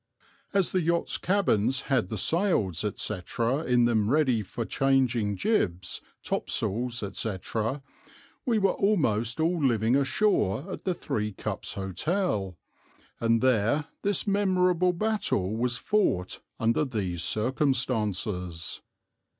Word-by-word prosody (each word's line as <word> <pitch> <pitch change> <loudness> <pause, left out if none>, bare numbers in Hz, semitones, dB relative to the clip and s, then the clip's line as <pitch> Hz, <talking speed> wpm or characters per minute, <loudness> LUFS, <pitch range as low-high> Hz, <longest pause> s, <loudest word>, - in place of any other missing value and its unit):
As 195 -3 +2
the 185 - +1
yachts' 170 +1 0
cabins 135 - +1
had 125 -9 0
the 110 - -3
sails, 110 - +1
etc., 115 - -1
in 125 -1 +3
them 110 -3 +2
ready 130 -5 +3
for 110 +4 -5
changing 125 -7 +1
jibs, 90 - 0 0.2
top - - -2
sails, 120 +2 -1
etc., 110 +6 -2 0.6
we 235 -3 +1
were 195 -2 +3
almost 120 - +1
all 165 0 +1
living 115 -2 +3
ashore 140 - +1
at - - -7
the 185 -2 0
Three 105 -8 -3
Cups - - -4
Hotel, 95 - -1 0.6
and 115 0 +2
there 130 +4 +2
this 200 -2 0
memorable 185 -3 +2
battle 175 - 0
was 125 +2 0
fought 200 - 0 0.2
under 115 +5 +2
these 95 - -3
circumstances. 105 - -1
125 Hz, 120 wpm, -27 LUFS, 105-170 Hz, 0.6 s, in